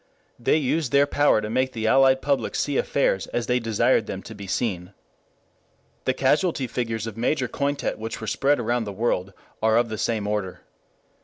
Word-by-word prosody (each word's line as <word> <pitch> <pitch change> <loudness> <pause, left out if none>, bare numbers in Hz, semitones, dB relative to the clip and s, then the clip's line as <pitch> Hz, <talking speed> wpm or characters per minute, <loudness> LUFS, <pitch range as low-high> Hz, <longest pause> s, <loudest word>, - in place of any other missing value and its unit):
They 120 - +2
used 150 -1 0
their 140 0 +5
power 145 -5 +3
to 105 - -4
make 130 +2 0
the 110 -1 -3
Allied 130 +2 +4
publics 140 -1 0
see 145 - -1
affairs 95 -11 +1
as 120 - -2
they 125 0 +1
desired 115 0 +1
them 95 - -5
to 110 - -9
be 100 -2 -9
seen. 95 -2 -2 1.1
The 130 - +2
casualty 145 +1 +1
figures 115 -2 -3
of 115 -2 -7
Major 125 +2 0
Cointet 140 0 -2
which 110 +1 -5
were 110 - -6
spread 135 +6 +1
about 120 0 0
the 100 - -5
world 100 -3 -1 0.3
are 110 0 +3
of 120 0 +2
the 110 -1 -5
same 110 -3 -1
order. 105 -3 -3
120 Hz, 185 wpm, -24 LUFS, 110-135 Hz, 1.1 s, their